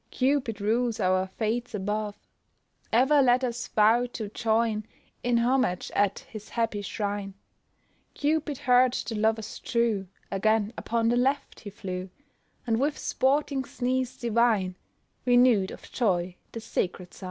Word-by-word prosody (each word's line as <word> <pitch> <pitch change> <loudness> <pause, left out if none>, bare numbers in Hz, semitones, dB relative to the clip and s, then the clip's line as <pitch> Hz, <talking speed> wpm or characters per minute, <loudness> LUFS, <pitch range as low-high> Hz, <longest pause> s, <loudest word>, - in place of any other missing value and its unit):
Cupid 255 -5 0
rules 230 +3 0
our 185 0 +2
fates 225 +4 -2
above, 210 +1 -2 0.7
Ever 270 +5 +5
let 250 0 +4
us 245 0 -2
vow 225 +3 +4
to 215 -3 -4
join 220 0 0 0.3
In 245 -1 +2
homage 240 -6 +1
at 200 -1 +2
his 215 -1 -10
happy 225 -3 -1
shrine." 200 -1 -3 0.8
Cupid 300 -1 0
heard 250 0 +4
the 240 - -3
lovers 220 0 -1
true, 230 -5 0 0.2
Again 215 +2 +1
upon 230 0 0
the 240 - +2
left 270 +3 0
he 205 - -8
flew, 185 -2 -6 0.6
And 225 -2 +1
with 290 +3 0
sporting 275 +1 +1
sneeze 255 0 -2
divine, 230 -5 +2 0.5
Renew'd 245 -6 +4
of - - -11
joy 185 -6 0 0.2
the 230 - -6
sacred 180 -4 -3
sign! - - -14
225 Hz, 135 wpm, -27 LUFS, 205-250 Hz, 0.8 s, Ever